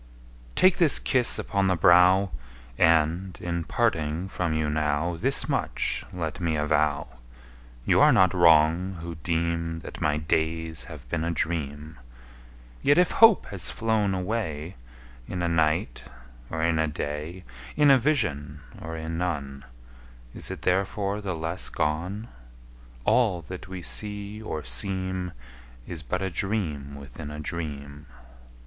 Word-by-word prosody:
Take 185 0 +5
this 165 -5 +5
kiss 125 -3 +3
upon 100 -2 0
the 95 - +2
brow! 90 +3 +5 0.4
And, 80 +5 +2
in 85 -1 -3
parting 85 -7 0
from 90 -3 -2
you 80 -1 0
now, 75 +2 0
Thus 80 - +1
much - - -1
let 85 -4 -4
me 85 -3 0
avow 75 -4 0 0.7
You - - +4
are - - +7
not 95 -2 +4
wrong, 85 +1 +4
who 85 0 -6
deem 85 0 -1
That - - -9
my 75 -1 +1
days 80 +1 -1
have 75 -7 -11
been 80 +5 -2
a 85 - -1
dream: 75 -3 -3 0.8
Yet 145 - +4
if 180 -1 +4
hope 225 -3 +6
has 95 -5 0
flown 110 -4 0
away 90 -5 -3 0.5
In 90 -1 -4
a - - +1
night, 80 -6 0 0.5
or 80 0 -3
in 80 -1 +2
a 80 - +2
day, 75 +4 -5 0.3
In 145 -1 +5
a 135 - +6
vision 75 - -1 0.2
or 80 +1 -6
in 80 +1 -4
none, 70 -6 -3 0.7
Is - - -4
it - - -7
therefore 100 +2 0
the 95 -3 -3
less 80 +3 -1
gone? 90 +9 -2 0.8
All 105 -9 +2
that 90 +3 -8
we 95 -2 -7
see 105 +1 -3
or 80 -8 -5
seem 95 +6 -1 0.5
Is 85 -3 -4
but 85 +7 -3
a 95 - -2
dream 80 -8 -3
within 70 0 -9
a 75 0 -7
dream. 75 -2 -6
85 Hz, 140 wpm, -26 LUFS, 75-95 Hz, 0.8 s, are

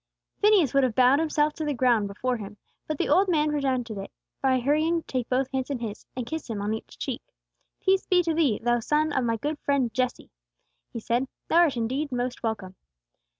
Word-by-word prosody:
Phineas 405 - +4
would 275 0 +4
have 245 -4 0
bowed 255 +3 +5
himself 305 -1 +1
to 315 - -5
the 295 -2 -1
ground 235 -4 +3
before 245 +5 -2
him, 210 -1 -9 0.3
but 310 - -2
the - - 0
old 375 +7 +4
man 305 -3 +2
prevented 255 -7 -1
it, 195 - -7 0.3
by 260 -1 +3
hurrying 310 +6 +1
to - - -48
take 250 -2 -3
both 255 +1 +1
hands 265 -1 -2
in 280 - -1
his, 220 -3 -7
and 250 -2 -3
kiss 315 +2 -5
him 220 -3 -3
on 205 +2 -1
each 220 - -7
cheek. - - -4 0.6
"Peace 385 0 +2
be 360 -1 +4
to 330 -1 0
thee, 295 -10 +2
thou 240 0 +2
son 300 +5 +1
of 265 - +1
my 230 -1 0
good 295 +6 -3
friend 270 -5 0
Jesse!" 255 0 -2 0.6
he 230 - -5
said. 240 +4 0 0.2
"Thou 330 - +3
art 320 -7 +4
indeed 265 +6 -2
most 250 0 -2
welcome." 210 -5 -3
260 Hz, 215 wpm, -26 LUFS, 235-300 Hz, 0.6 s, bowed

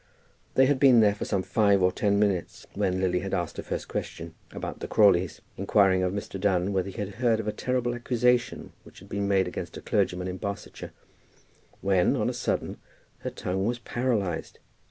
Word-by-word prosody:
They 130 - +6
had 140 0 +2
been 130 -4 +7
there 105 -2 +5
for 105 - -5
some 95 -3 -1
five 100 -3 +3
or 90 - +4
ten 100 +1 +1
minutes, 100 -4 0
and 95 -2 0
Lily 90 -1 +1
had 95 +1 -3
asked 85 -3 -3
her - - -3
first - - -4
question 80 0 -5 0.2
about - - -6
the - - -5
Crawleys, 95 -5 +3 0.2
inquiring 95 -1 +3
of 90 -1 +1
Mr. 100 -1 -5
Dunn 95 -1 +1
whether 95 0 0
he 95 - -11
had 100 -1 -2
heard 115 -3 +3
of 110 - -4
a - - +1
terrible 125 +2 -1
accusation 120 0 0
which - - -17
had 95 - -14
been 100 0 -2
made 95 -2 +2
against 90 - -6
a - - -8
clergyman 90 0 0
in 90 0 -4
Barsetshire, 100 0 -6 0.9
when 95 -2 +3
on - - 0
a - - -7
sudden - - -2 0.4
her - - -4
tongue 95 +2 -2
was 120 +1 -1
paralyzed. 115 -9 -2
100 Hz, 195 wpm, -27 LUFS, 95-110 Hz, 0.9 s, been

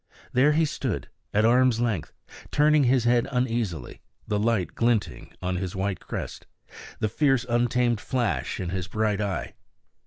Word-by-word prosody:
There 140 +4 +4
he 160 +1 +3
stood, 150 - -3 0.2
at 105 +2 +3
arm's 125 0 +4
length, 115 -9 -1 0.4
turning 150 -1 +4
his 125 -1 +3
head 120 0 +3
uneasily, 115 - -2 0.3
the 105 -1 0
light 105 -6 0
glinting 115 -3 0
on 90 0 -1
his 95 0 -4
white 95 -1 -1
crest, - - -6 0.5
the 110 - 0
fierce, 135 +2 +2
untamed 120 -1 +1
flash 125 -5 -1
in 90 -2 -3
his 90 0 -3
bright 105 +1 0
eye. 100 -2 -3
115 Hz, 150 wpm, -26 LUFS, 100-125 Hz, 0.5 s, There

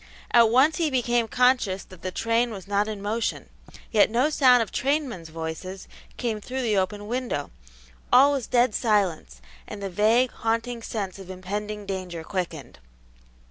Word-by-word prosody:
At 235 -2 +6
once 275 +7 +4
he 330 -3 +1
became 240 -3 +1
conscious 245 -6 +2
that 185 -3 -15
the 185 - -3
train 230 +5 0
was 195 -4 -8
not 205 +1 +1
in 210 -2 -5
motion, 220 +3 -2 0.4
yet 215 -1 +5
no 250 +7 +2
sound 250 -5 +5
of 215 - -10
trainmen's 265 - -1
voices 165 +4 -6 0.3
came 225 -4 -2
through 260 +4 -4
the 220 -3 +1
open 200 +2 -1
window; 240 - -3 0.6
all 275 +3 +7
was 275 -5 -2
dead 245 -2 +3
silence, 185 - 0 0.3
and 210 - -7
the 195 -1 -5
vague, 225 +6 +3
haunting 230 +1 -2
sense 200 -4 -5
of 190 -1 -11
impending 205 +3 -5
danger 185 -4 -5
quickened. 160 - -5
215 Hz, 160 wpm, -25 LUFS, 190-245 Hz, 0.6 s, all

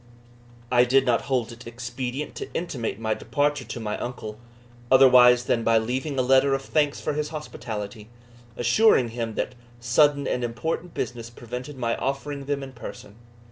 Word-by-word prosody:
I 125 -1 +6
did 135 +2 +3
not 120 -2 +1
hold 125 -4 0
it 115 +1 -11
expedient 125 +4 -5
to - - -6
intimate 130 -11 -3
my 110 -1 0
departure 145 +2 -1
to - - -6
my 105 -2 -3
uncle, 110 -3 -6 0.5
otherwise 125 -2 +7
than 115 -1 0
by 115 0 +4
leaving 130 +6 -2
a 130 - +2
letter 135 +2 +4
of 135 - -4
thanks 145 0 +1
for - - -2
his 150 0 -2
hospitality, 110 -8 -6 0.5
assuring 125 - +4
him 115 -1 -4
that - - -2 0.3
sudden 140 +4 +3
and 125 - -1
important 160 +8 -3
business 120 -2 -4
prevented 125 +4 -8
my 115 -2 0
offering 140 +1 -3
them 140 0 -2
in 135 - -8
person. 110 -3 -10
125 Hz, 165 wpm, -25 LUFS, 115-140 Hz, 0.5 s, otherwise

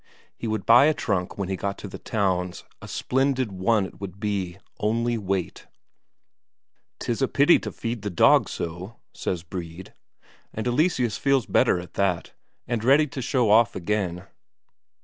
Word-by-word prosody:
He 115 - -5
would 110 -3 -2
buy 120 +4 +7
a 155 0 +3
trunk 95 -9 -2
when 100 -2 -2
he 95 - -2
got 100 +1 -3
to - - -7
the 95 - -9
towns, 95 -4 -1 0.2
a - - -9
splendid 130 -3 0
one 95 +2 +1
it - - -9
should 100 -1 -7
be, 100 -4 -2 0.2
only 115 +3 0
wait! 95 -4 -3 1.3
"'Tis - - -2
a - - +3
pity - - +4
to - - -6
feed 115 -1 -4
the 105 - -3
dog 85 - +4
so," 90 +6 -6 0.2
says 85 -3 -3
Brede. 90 0 -8 0.6
And 110 - -3
Eleseus 125 - +1
feels 135 -4 +2
better 90 - +3
at 90 -1 -10
that, 95 -4 -1 0.3
and 120 -2 -2
ready 140 +5 +5
to 140 -1 -5
show 120 -4 +1
off 115 +1 +5
again. 90 -1 -2
105 Hz, 165 wpm, -25 LUFS, 95-120 Hz, 1.3 s, buy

